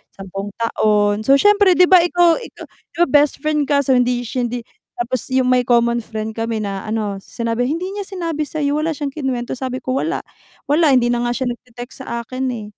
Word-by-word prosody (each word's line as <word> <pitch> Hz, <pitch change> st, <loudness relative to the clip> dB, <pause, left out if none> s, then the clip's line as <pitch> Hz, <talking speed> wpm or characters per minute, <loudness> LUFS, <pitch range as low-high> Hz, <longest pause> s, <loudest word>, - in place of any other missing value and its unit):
10 195 Hz, +1 st, -6 dB
taon. 210 Hz, -2 st, +1 dB
So, 275 Hz, -, +7 dB
siyempre 410 Hz, +3 st, +5 dB
di 360 Hz, -, +6 dB
ba 365 Hz, 0 st, +7 dB
ikaw 345 Hz, -1 st, +3 dB
ikaw -, -, -11 dB, 0.3 s
di -, -, -14 dB
ba -, -, +2 dB
bestfriend 295 Hz, 0 st, +2 dB
ka 280 Hz, -1 st, +2 dB
so, 265 Hz, -, 0 dB
hindi 245 Hz, -1 st, +2 dB
siya 245 Hz, +1 st, -2 dB
hindi 240 Hz, 0 st, -5 dB, 0.3 s
tapos 245 Hz, +2 st, -3 dB
yung 260 Hz, -1 st, +1 dB
may 250 Hz, -1 st, +2 dB
common 235 Hz, 0 st, +3 dB
friend 220 Hz, -1 st, -5 dB
kami 225 Hz, -1 st, -2 dB
na 195 Hz, 0 st, -5 dB
ano 210 Hz, -2 st, -2 dB
sinabi, 230 Hz, +4 st, -2 dB
"hindi 330 Hz, +5 st, -2 dB
niya 400 Hz, -1 st, -5 dB
sinabi 330 Hz, -6 st, -3 dB
sa'yo, 290 Hz, 0 st, -1 dB
wala 320 Hz, +1 st, -1 dB
siyang 285 Hz, -1 st, -4 dB
kinuwento," 265 Hz, -4 st, -3 dB
sabi 255 Hz, 0 st, -4 dB
ko, 255 Hz, -, -3 dB
"Wala. 330 Hz, +4 st, -2 dB, 0.5 s
Wala. 315 Hz, +2 st, +4 dB
Hindi 240 Hz, -1 st, +3 dB
na 240 Hz, -, 0 dB
nga 240 Hz, -, -1 dB
siya 255 Hz, -2 st, -1 dB
nagte-text 240 Hz, +1 st, -10 dB
sa 235 Hz, -2 st, -5 dB
akin, 255 Hz, +3 st, -4 dB
eh." 220 Hz, -, -6 dB
255 Hz, 205 wpm, -19 LUFS, 235-300 Hz, 0.5 s, So